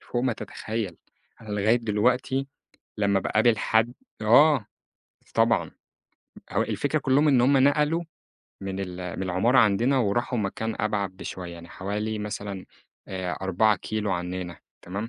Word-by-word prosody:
فوق 120 - -3
ما 130 -1 +1
تتخيّل. 110 -5 -5 0.4
أنا 110 - -13
لغاية 105 +3 +2
دلوقتي 125 +4 0 0.5
لمّا 100 -2 +2
باقابل 110 +3 +2
حد 110 +2 +2 0.3
آه. 130 +2 +5 0.7
طبعًا. - - +2 0.8
هو - - +2
الفكرة - - -1
كُلّهم 140 +3 +3
إن 130 -4 +5
هم 135 +3 +4
نقلوا 150 +5 +3 0.6
من 95 0 -4
ال 90 -1 -5
من - - -2
العمارة 95 +8 +2
عندنا، 120 +4 +4
وراحوا 120 +2 0
مكان 110 +2 -2
أبعد 105 -2 0
بشوية 90 -2 -7
يعني 85 0 -11
حوالي 105 +3 -3
مثلًا 100 -2 -5 0.4
أ 95 -2 -3
4 100 +3 +3
كيلو 105 +2 -3
عنّنا 90 0 -4 0.2
تمام؟ 100 +5 -5
105 Hz, 135 wpm, -26 LUFS, 95-120 Hz, 0.8 s, آه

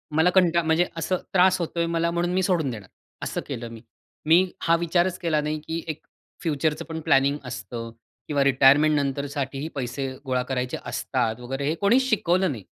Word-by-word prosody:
मला 160 +3 +4
कंट 175 -2 +4
म्हणजे 165 +1 +3
असं 185 +3 0 0.2
त्रास 185 0 +4
होतो 170 0 -3
आहे 170 - +1
मला 170 0 0
म्हणून 175 +1 -1
मी 190 - +2
सोडून 175 -6 +1
देणार. 105 -5 -9 0.3
असं - - -3
केलं 120 -4 -5
मी. 115 -1 -10 0.4
मी 175 +4 +4
हा 165 - +3
विचारच 175 +2 +1
केला 155 -3 +1
नाही, 150 +1 -2
की 165 +1 -3
एक 155 - -5 0.4
फ्युचरचं 155 -3 -1
पण 160 -1 -5
प्लॅनिंग 140 0 +3
असतं 120 -2 -6 0.4
किंवा 145 -2 +1
रिटायरमेंट 140 +3 +5
नंतर 140 -1 -1
साठीही 140 +1 -4
पैसे 135 +1 -3 0.2
गोळा 130 -1 0
करायचे 125 -1 -3
असतात 120 -3 -2
वगैरे 135 +3 -4
हे 155 - 0
कोणीच 235 +7 +4
शिकवलं 185 -4 +2
नाही. 115 -7 -7
155 Hz, 185 wpm, -25 LUFS, 135-170 Hz, 0.4 s, रिटायरमेंट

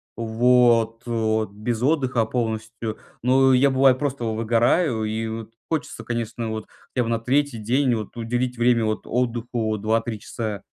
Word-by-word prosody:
вот 115 0 +3
вот 110 -2 0
без 110 +3 -3
отдыха 130 -5 +2
полностью, 110 -1 -3 0.3
но 130 +1 +4
я, 135 +2 +5
бывает, 130 -1 +4
просто 140 -3 -2
выгораю 115 +3 +1
и 110 +1 -2
вот 110 0 -6 0.2
хочется, 160 -3 -3
конечно, 115 -1 -3
вот 110 -1 -4 0.3
я 125 - +2
бы 115 - -3
на 115 - 0
3 135 +2 +1
день 125 +4 +1
вот 110 +1 -4
уделить 120 +2 -2
время 120 -1 +3
от 110 0 -2
отдыху 120 -2 -1
2-3 110 +1 -1
часа. 105 -4 -5
115 Hz, 150 wpm, -23 LUFS, 110-125 Hz, 0.3 s, я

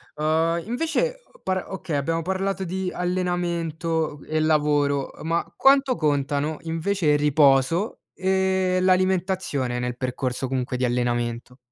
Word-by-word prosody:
Uhm, 160 +2 +1
invece, 330 - -1
uhm, - - -22
par 185 -1 -1
okay 175 -5 -4
abbiamo 165 +4 -1
parlato 190 +2 -2
di 185 +1 -3
allenamento 170 -4 -1
e 155 0 -1
lavoro, 145 -3 +2
uhm, - - -10
ma 170 +1 -1
quanto 270 -1 +4
contano 145 -1 0
invece 165 +2 -1
il 150 - +5
riposo 145 - +3
e 190 -1 +1
l'alimentazione 185 -8 +1
nel 125 0 -3
percorso 130 0 -2
comunque 125 -1 -2
di 125 - +1
allenamento? 120 0 -1
165 Hz, 130 wpm, -24 LUFS, 140-185 Hz, -, il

